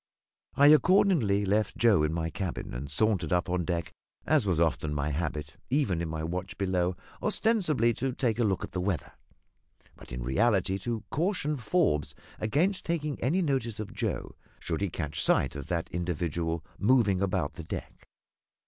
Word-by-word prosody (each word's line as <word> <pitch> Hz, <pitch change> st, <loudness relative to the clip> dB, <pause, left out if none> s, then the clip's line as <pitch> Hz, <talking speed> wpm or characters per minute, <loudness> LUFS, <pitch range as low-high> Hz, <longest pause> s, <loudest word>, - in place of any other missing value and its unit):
I 145 Hz, +1 st, +7 dB
accordingly 150 Hz, -, +4 dB
left 105 Hz, +1 st, 0 dB
Joe 115 Hz, -8 st, +4 dB
in 75 Hz, 0 st, +1 dB
my 80 Hz, 0 st, -2 dB
cabin, 90 Hz, 0 st, -4 dB
and 70 Hz, +4 st, -5 dB
sauntered 95 Hz, 0 st, +1 dB
up 90 Hz, +1 st, +1 dB
on 90 Hz, -2 st, 0 dB
deck, 85 Hz, -2 st, -2 dB, 0.3 s
as 145 Hz, -9 st, +2 dB
was 90 Hz, -4 st, +1 dB
often 75 Hz, -2 st, +1 dB
my 75 Hz, +1 st, -1 dB
habit, 75 Hz, -1 st, -3 dB
even 120 Hz, -, +1 dB
in 85 Hz, -, -3 dB
my 80 Hz, 0 st, -4 dB
watch 90 Hz, +3 st, -4 dB
below, 90 Hz, -2 st, 0 dB, 0.3 s
ostensibly 185 Hz, -, +2 dB
to 130 Hz, +3 st, -2 dB
take 120 Hz, -3 st, -1 dB
a -, -, +3 dB
look 100 Hz, -4 st, 0 dB
at -, -, -6 dB
the 90 Hz, -, -2 dB
weather, 90 Hz, -3 st, -2 dB, 0.8 s
but -, -, -13 dB
in -, -, -4 dB
reality 95 Hz, -, +2 dB
to 115 Hz, -1 st, -3 dB
caution 160 Hz, -3 st, 0 dB
Forbes 110 Hz, -, 0 dB, 0.2 s
against 165 Hz, -, +1 dB
taking 150 Hz, -4 st, -2 dB
any 165 Hz, +10 st, +2 dB
notice 130 Hz, -7 st, -1 dB
of 110 Hz, -, -5 dB
Joe, -, -, -3 dB, 0.3 s
should 85 Hz, +2 st, -3 dB
he 100 Hz, -, 0 dB
catch 75 Hz, -2 st, -3 dB
sight -, -, +2 dB
of 70 Hz, +1 st, -6 dB
that 85 Hz, -1 st, -1 dB
individual 85 Hz, -1 st, -2 dB
moving 105 Hz, -5 st, +3 dB
about 90 Hz, -6 st, 0 dB
the 85 Hz, +2 st, -8 dB
deck. -, -, -7 dB
95 Hz, 170 wpm, -29 LUFS, 80-125 Hz, 0.8 s, I